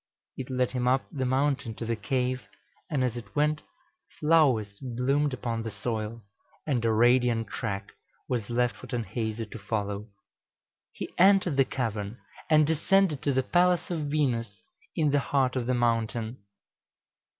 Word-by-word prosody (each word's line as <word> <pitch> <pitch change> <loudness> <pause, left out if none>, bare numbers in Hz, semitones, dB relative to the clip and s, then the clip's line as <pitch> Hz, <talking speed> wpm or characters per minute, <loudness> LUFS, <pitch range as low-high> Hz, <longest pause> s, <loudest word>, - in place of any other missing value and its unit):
It 130 -1 -6
led 125 -1 0
him 125 -1 -1
up 130 +1 +2
the 130 -3 -2
mountain 130 -3 0
to 115 - -5
the 115 0 0
cave, 125 +4 -1 0.5
and 145 -6 0
as 125 -2 0
it 105 -5 -9
went 150 +1 +2 0.6
flowers 130 -11 +3
bloomed 135 +3 0
upon 120 -3 -3
the 115 - -4
soil, 110 +1 -4 0.4
and 130 -6 0
a 115 - +3
radiant 120 -1 +3
track 100 -3 -4 0.4
was 120 -4 -2
left 120 -2 +1
for - - -11
Tanhäuser 115 -1 -3
to 115 - -7
follow. 105 0 -3 0.8
He - - -7
entered 190 -4 +5
the 135 -1 +4
cavern, 110 -4 -3 0.3
and 155 -1 +6
descended 160 0 +2
to 145 - +1
the 130 0 +1
palace 175 +4 +2
of 155 -4 -2
Venus 120 -8 -1 0.3
in 150 -2 +2
the 145 - +3
heart 135 -2 +1
of 125 -2 -1
the 125 - +2
mountain. 115 0 0
125 Hz, 155 wpm, -28 LUFS, 115-140 Hz, 0.8 s, and